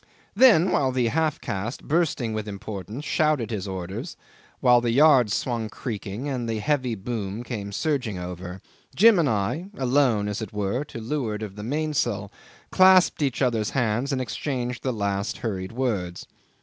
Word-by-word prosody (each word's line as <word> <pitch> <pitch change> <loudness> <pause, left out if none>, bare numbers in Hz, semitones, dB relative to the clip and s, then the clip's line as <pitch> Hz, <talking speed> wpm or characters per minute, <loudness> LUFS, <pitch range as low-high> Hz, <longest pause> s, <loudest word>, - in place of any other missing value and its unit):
'Then, 205 -6 +6
while 135 -2 +2
the 125 -2 +1
half 155 +2 0
caste, 105 +7 -4
bursting 150 -8 0
with 110 -1 -3
importance, 105 - -6
shouted 150 -8 +1
his 105 -3 -3
orders, 95 0 -5 0.4
while 125 -1 +5
the 120 - 0
yards 130 -3 +5
swung 115 -3 -2
creaking 105 +2 -5
and 125 -4 -3
the 110 - -1
heavy 130 0 0
boom 105 0 -4
came 105 -5 -5
surging 125 - -1
over, 90 +1 -7 0.3
Jim 215 -1 +6
and 155 -5 +2
I, 110 - -1
alone 125 -5 +2
as 105 +2 -3
it 110 - -5
were, 105 +6 -1
to 120 - -8
leeward 110 -3 -3
of 100 -2 -7
the 105 - -7
mainsail, 120 -6 -1 0.4
clasped 185 -3 +5
each 135 -2 0
other's 115 -4 +1
hands 120 +3 0
and 135 - 0
exchanged 125 0 -3
the 130 - -1
last 100 -2 -2
hurried 95 -5 -4
words. 105 -8 -2
120 Hz, 160 wpm, -25 LUFS, 105-140 Hz, 0.4 s, Then